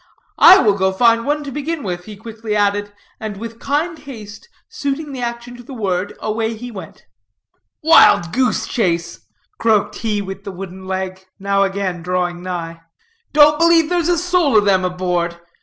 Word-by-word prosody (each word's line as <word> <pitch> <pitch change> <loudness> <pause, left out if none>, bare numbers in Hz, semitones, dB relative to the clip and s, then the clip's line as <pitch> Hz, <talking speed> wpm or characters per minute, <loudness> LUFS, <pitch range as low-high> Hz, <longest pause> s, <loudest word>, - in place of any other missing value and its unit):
"I 375 - +9
will 210 -4 +3
go 190 -1 +1
find 230 +4 +3
one 295 +1 0
to 280 - -7
begin 295 +2 -4
with," 175 -3 -5
he 215 - -9
quickly 220 0 -5
added, 205 0 0 0.3
and, 215 -2 -6
with 230 +2 -8
kind 315 +4 -2
haste 235 - -11 0.2
suiting 285 +1 -4
the 260 -2 -6
action 240 0 -5
to - - -11
the 265 +2 -10
word, 195 -3 -2
away 220 +1 -2
he 245 +2 -8
went. 190 -7 -11 0.8
"Wild 185 - +5
goose 255 0 +1
chase!" 170 -7 -1 0.4
croaked 220 -3 +1
he 215 -2 -1
with 195 0 -6
the 200 - -6
wooden 190 0 -9
leg, 190 0 -4
now 200 0 0
again 195 -3 -1
drawing 175 0 -2
nigh. 170 -2 -6 0.5
"Don't 300 0 +5
believe 335 -1 +4
there's 350 -1 0
a 350 - +2
soul 350 -7 +2
of 205 - +3
them 190 -2 +3
aboard. 180 -2 -2
210 Hz, 175 wpm, -18 LUFS, 190-270 Hz, 0.8 s, I